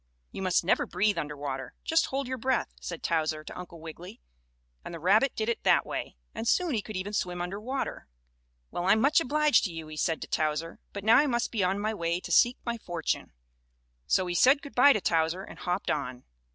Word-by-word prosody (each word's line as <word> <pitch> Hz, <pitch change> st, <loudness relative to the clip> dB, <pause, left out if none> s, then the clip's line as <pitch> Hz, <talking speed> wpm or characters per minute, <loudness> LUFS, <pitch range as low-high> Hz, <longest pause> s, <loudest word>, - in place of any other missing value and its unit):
"You -, -, -6 dB
must 185 Hz, -2 st, +2 dB
never 175 Hz, -, +2 dB
breathe 210 Hz, 0 st, +1 dB
under 150 Hz, 0 st, -5 dB
water 135 Hz, -3 st, -5 dB
just 325 Hz, +1 st, +2 dB
hold 270 Hz, 0 st, -2 dB
your 260 Hz, 0 st, -4 dB
breath," 260 Hz, +1 st, 0 dB
said 170 Hz, -2 st, -6 dB
Towser 155 Hz, -2 st, 0 dB
to -, -, -9 dB
Uncle 175 Hz, -2 st, -9 dB
Wiggily, 165 Hz, +2 st, -10 dB, 0.6 s
and -, -, -7 dB
the -, -, -7 dB
rabbit 215 Hz, -, +3 dB
did 220 Hz, -, -2 dB
it 235 Hz, -, -1 dB
that -, -, +4 dB
way, -, -, -5 dB, 0.2 s
and 230 Hz, -, -4 dB
soon 350 Hz, +3 st, +2 dB
he 220 Hz, -, 0 dB
could 215 Hz, -1 st, -6 dB
even 200 Hz, +3 st, -4 dB
swim 180 Hz, -3 st, -2 dB
under 180 Hz, +4 st, -4 dB
water. 260 Hz, +4 st, -4 dB, 0.6 s
"Well, 175 Hz, -, -3 dB
I'm 215 Hz, -, +5 dB
much 290 Hz, +7 st, +4 dB
obliged 300 Hz, -1 st, +3 dB
to 185 Hz, -, -3 dB
you," 165 Hz, -1 st, -7 dB
he 155 Hz, -, -8 dB
said 165 Hz, +1 st, 0 dB
to -, -, -8 dB
Towser, 155 Hz, +1 st, -1 dB
"but 200 Hz, -, -6 dB
now 220 Hz, +3 st, +6 dB
I 295 Hz, +3 st, +4 dB
must 240 Hz, -3 st, 0 dB
be 215 Hz, -5 st, 0 dB
on 190 Hz, +2 st, +1 dB
my 215 Hz, +2 st, -1 dB
way 170 Hz, -3 st, -1 dB
to -, -, -8 dB
seek 240 Hz, +1 st, +5 dB
my 235 Hz, -1 st, -2 dB
fortune." 175 Hz, -5 st, -3 dB, 0.8 s
So 185 Hz, -, +2 dB
he 175 Hz, -, -2 dB
said 270 Hz, +10 st, +5 dB
good 285 Hz, -, -9 dB
by 280 Hz, +3 st, +7 dB
to 210 Hz, -, -1 dB
Towser 165 Hz, +2 st, +1 dB
and -, -, -11 dB
hopped 180 Hz, +2 st, -1 dB
on. 130 Hz, -4 st, -3 dB
190 Hz, 225 wpm, -28 LUFS, 165-235 Hz, 0.8 s, by